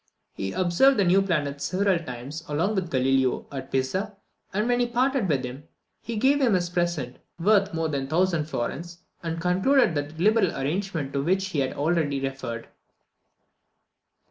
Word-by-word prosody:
He 95 Hz, 0 st, -4 dB
observed 185 Hz, +10 st, +3 dB
the 200 Hz, -, +4 dB
new 185 Hz, +2 st, +4 dB
planets 145 Hz, -7 st, -1 dB
several 190 Hz, -1 st, +1 dB
times, 135 Hz, +2 st, -7 dB
along 165 Hz, +8 st, 0 dB
with 190 Hz, -4 st, -1 dB
Galileo, 130 Hz, -1 st, +1 dB
at 135 Hz, -1 st, -7 dB
Pisa; 190 Hz, +11 st, -1 dB, 0.3 s
and 210 Hz, +4 st, 0 dB
when 245 Hz, 0 st, +2 dB
he 245 Hz, -, +2 dB
parted 250 Hz, -3 st, +1 dB
with 135 Hz, -4 st, +1 dB
him, 130 Hz, +4 st, -8 dB, 0.4 s
he 230 Hz, -, -5 dB
gave 275 Hz, +5 st, +3 dB
him 235 Hz, -7 st, +4 dB
a 180 Hz, -, +2 dB
present 175 Hz, -7 st, -2 dB, 0.2 s
worth 200 Hz, +2 st, +3 dB
more 165 Hz, 0 st, -1 dB
than 140 Hz, -3 st, -3 dB
1000 170 Hz, -1 st, +1 dB
florins, 165 Hz, +5 st, -4 dB, 0.2 s
and 165 Hz, -1 st, -3 dB
concluded 190 Hz, +6 st, +3 dB
that 145 Hz, +1 st, -4 dB
liberal 205 Hz, -2 st, +3 dB
arrangement 155 Hz, 0 st, -2 dB
to 140 Hz, -1 st, 0 dB
which 190 Hz, +3 st, 0 dB
we 150 Hz, -, 0 dB
have 130 Hz, -1 st, -1 dB
already 150 Hz, -2 st, +1 dB
referred. 135 Hz, -4 st, -4 dB
170 Hz, 165 wpm, -26 LUFS, 140-195 Hz, 0.4 s, the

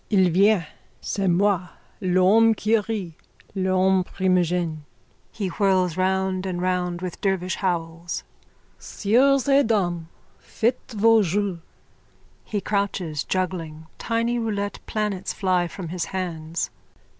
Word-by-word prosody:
Il 190 Hz, -4 st, +4 dB
vient! 195 Hz, 0 st, +4 dB, 0.3 s
C'est 195 Hz, -1 st, -2 dB
moi! 185 Hz, 0 st, +2 dB, 0.3 s
L'homme 195 Hz, +5 st, +4 dB
qui 215 Hz, +2 st, +2 dB
rit! 205 Hz, -5 st, -2 dB, 0.4 s
L'homme 190 Hz, 0 st, +2 dB
primigène! 180 Hz, -3 st, 0 dB, 0.5 s
(He 210 Hz, -, -4 dB
whirls 185 Hz, -2 st, +1 dB
round 190 Hz, 0 st, 0 dB
and 180 Hz, -2 st, -3 dB
round 180 Hz, -1 st, -1 dB
with 180 Hz, -2 st, -6 dB
dervish 185 Hz, -2 st, 0 dB
howls.) 170 Hz, -2 st, -3 dB, 0.6 s
Sieurs 265 Hz, +6 st, +2 dB
et 275 Hz, -2 st, +4 dB
dames, 175 Hz, -7 st, 0 dB, 0.3 s
faites 240 Hz, +1 st, -2 dB
vos 225 Hz, +1 st, +5 dB
jeux! 190 Hz, -1 st, -1 dB, 0.8 s
(He 210 Hz, -, -3 dB
crouches 190 Hz, -6 st, -2 dB
juggling. 170 Hz, -4 st, -3 dB
Tiny 235 Hz, +1 st, 0 dB
roulette 205 Hz, -3 st, -2 dB
planets 210 Hz, -3 st, -2 dB
fly 185 Hz, -3 st, +1 dB
from 170 Hz, -1 st, -7 dB
his 175 Hz, -1 st, -2 dB
hands.) 170 Hz, -3 st, -4 dB
185 Hz, 115 wpm, -24 LUFS, 175-205 Hz, 0.8 s, vos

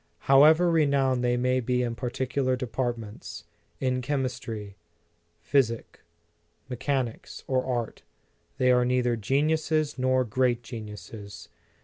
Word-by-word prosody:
However 155 Hz, +6 st, +6 dB
renowned 140 Hz, -5 st, +2 dB
they 120 Hz, 0 st, +2 dB
may 125 Hz, +1 st, +1 dB
be 125 Hz, 0 st, 0 dB
in 120 Hz, -1 st, -2 dB
partic 125 Hz, +1 st, -3 dB
ular 130 Hz, -1 st, +1 dB
departments, 120 Hz, -7 st, -4 dB, 0.4 s
in 130 Hz, -1 st, 0 dB
chemistry, 125 Hz, -6 st, -3 dB, 0.7 s
physic, 120 Hz, -5 st, 0 dB, 0.7 s
me 130 Hz, -, -5 dB
chanics, 130 Hz, -2 st, -3 dB
or 130 Hz, -1 st, 0 dB
art, 120 Hz, -3 st, -3 dB, 0.6 s
they 125 Hz, 0 st, +3 dB
are 125 Hz, 0 st, +4 dB
neither 125 Hz, -1 st, +1 dB
geniuses 150 Hz, +5 st, 0 dB
nor 130 Hz, 0 st, +2 dB
great 120 Hz, +1 st, 0 dB
geniuses. 105 Hz, -2 st, -9 dB
125 Hz, 115 wpm, -27 LUFS, 120-135 Hz, 0.7 s, However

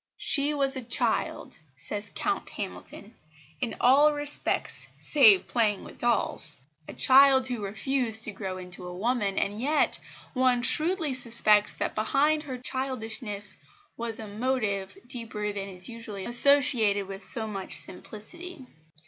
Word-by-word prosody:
"She 285 Hz, 0 st, +1 dB
was 275 Hz, -1 st, -1 dB
a 260 Hz, -, -3 dB
child," 235 Hz, -1 st, +1 dB, 0.2 s
says 205 Hz, +7 st, -3 dB
Count 405 Hz, -, -2 dB
Hamilton, 210 Hz, -, -8 dB, 0.5 s
"in 230 Hz, -, -3 dB
all 285 Hz, +4 st, +5 dB
respects 290 Hz, 0 st, +1 dB
save 410 Hz, -5 st, +6 dB
playing 215 Hz, -4 st, 0 dB
with -, -, -13 dB
dolls" 235 Hz, -9 st, -1 dB, 0.3 s
a -, -, -8 dB
child 265 Hz, 0 st, +5 dB
who 245 Hz, -4 st, -3 dB
refused 225 Hz, +2 st, 0 dB
to 215 Hz, -, -2 dB
grow 190 Hz, -2 st, -6 dB
into 180 Hz, 0 st, -6 dB
a 180 Hz, -, -8 dB
woman, 210 Hz, -2 st, -1 dB
and 205 Hz, +3 st, -2 dB
yet, 295 Hz, +4 st, +1 dB, 0.3 s
one 255 Hz, -2 st, +2 dB
shrewdly 315 Hz, 0 st, +2 dB
suspects 225 Hz, -4 st, +3 dB
that -, -, -3 dB
behind 285 Hz, +8 st, +1 dB
her 270 Hz, -4 st, -6 dB
childishness 225 Hz, -6 st, -4 dB, 0.4 s
was 230 Hz, -1 st, -3 dB
a 220 Hz, -, -8 dB
motive 205 Hz, -4 st, -2 dB
deeper 225 Hz, -4 st, -5 dB
than 200 Hz, -1 st, -6 dB
is 180 Hz, -1 st, -6 dB
usually 225 Hz, -4 st, -7 dB
associated 240 Hz, -6 st, +4 dB
with 195 Hz, +1 st, -8 dB
so 225 Hz, -2 st, 0 dB
much 195 Hz, -3 st, -3 dB
simplicity. 300 Hz, -, -7 dB
235 Hz, 140 wpm, -27 LUFS, 205-270 Hz, 0.5 s, save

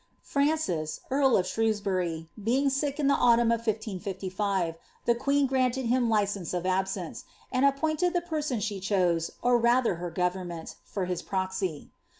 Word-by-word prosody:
Francis, 280 Hz, -, 0 dB
earl 270 Hz, -1 st, +4 dB
of 180 Hz, -, +1 dB
Shrewsbury, 190 Hz, -7 st, -1 dB, 0.2 s
being 270 Hz, +5 st, +2 dB
sick 280 Hz, +2 st, -1 dB
In 295 Hz, -, +1 dB
the 280 Hz, -, +5 dB
antnmn 235 Hz, -2 st, +4 dB
of 230 Hz, 0 st, -3 dB
1555, 195 Hz, -3 st, -2 dB, 0.3 s
the 235 Hz, -, +4 dB
queen 280 Hz, +4 st, +2 dB
granted 260 Hz, -1 st, +1 dB
him 240 Hz, 0 st, +2 dB
license 200 Hz, -5 st, 0 dB
of>absrace, 185 Hz, 0 st, -2 dB, 0.3 s
and 255 Hz, +1 st, +2 dB
appointed 310 Hz, +5 st, +1 dB
the 350 Hz, -, +1 dB
person 305 Hz, -6 st, -2 dB
eiie 205 Hz, -1 st, -3 dB
ehose, 180 Hz, -4 st, +1 dB
or 245 Hz, -1 st, +4 dB
mther 235 Hz, -6 st, +3 dB
her 175 Hz, 0 st, -3 dB
ffovemment, 180 Hz, -1 st, -3 dB
for 195 Hz, -3 st, -3 dB
his 180 Hz, -1 st, -2 dB
proxy. 190 Hz, -4 st, -3 dB
215 Hz, 150 wpm, -28 LUFS, 185-265 Hz, 0.3 s, the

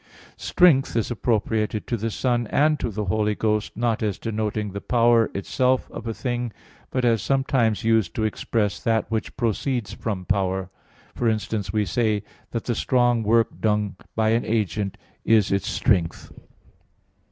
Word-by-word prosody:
"Strength" 150 Hz, -10 st, +3 dB
is 115 Hz, +1 st, 0 dB
appropriated 110 Hz, -2 st, 0 dB
to 120 Hz, -, -1 dB
the 115 Hz, 0 st, -2 dB
Son 120 Hz, +1 st, 0 dB
and 150 Hz, +4 st, +2 dB
to -, -, -1 dB
the 105 Hz, 0 st, -3 dB
Holy 105 Hz, +2 st, +1 dB
Ghost, 105 Hz, -1 st, -1 dB
not 115 Hz, -1 st, 0 dB
as 105 Hz, -3 st, -1 dB
denoting 105 Hz, -2 st, -2 dB
the 100 Hz, +1 st, -6 dB
power 120 Hz, -2 st, +3 dB
itself 125 Hz, +6 st, 0 dB
of 115 Hz, -, -7 dB
a 115 Hz, -, -2 dB
thing, 120 Hz, -2 st, -2 dB, 0.4 s
but 130 Hz, -1 st, -1 dB
as 115 Hz, -3 st, +3 dB
sometimes 130 Hz, -5 st, +1 dB
used 110 Hz, -2 st, +2 dB
to 110 Hz, -, -1 dB
express 110 Hz, -1 st, -1 dB
that 115 Hz, -1 st, 0 dB
which 110 Hz, -1 st, -3 dB
proceeds 120 Hz, -1 st, -1 dB
from 95 Hz, -4 st, -4 dB
power; 95 Hz, -1 st, -1 dB, 0.4 s
for 120 Hz, -, +1 dB
instance, 110 Hz, -2 st, -2 dB
we 105 Hz, -1 st, +1 dB
say 110 Hz, -2 st, 0 dB, 0.3 s
that 115 Hz, -, -3 dB
the 120 Hz, -, -1 dB
strong 120 Hz, -1 st, +2 dB
work 115 Hz, +1 st, +3 dB
done 105 Hz, -2 st, +1 dB, 0.2 s
by 110 Hz, -1 st, +2 dB
an 115 Hz, +1 st, +2 dB
agent 105 Hz, -3 st, -1 dB, 0.3 s
is 110 Hz, -3 st, +3 dB
its 100 Hz, 0 st, 0 dB
strength. 85 Hz, -6 st, 0 dB
110 Hz, 160 wpm, -24 LUFS, 105-120 Hz, 0.4 s, Strength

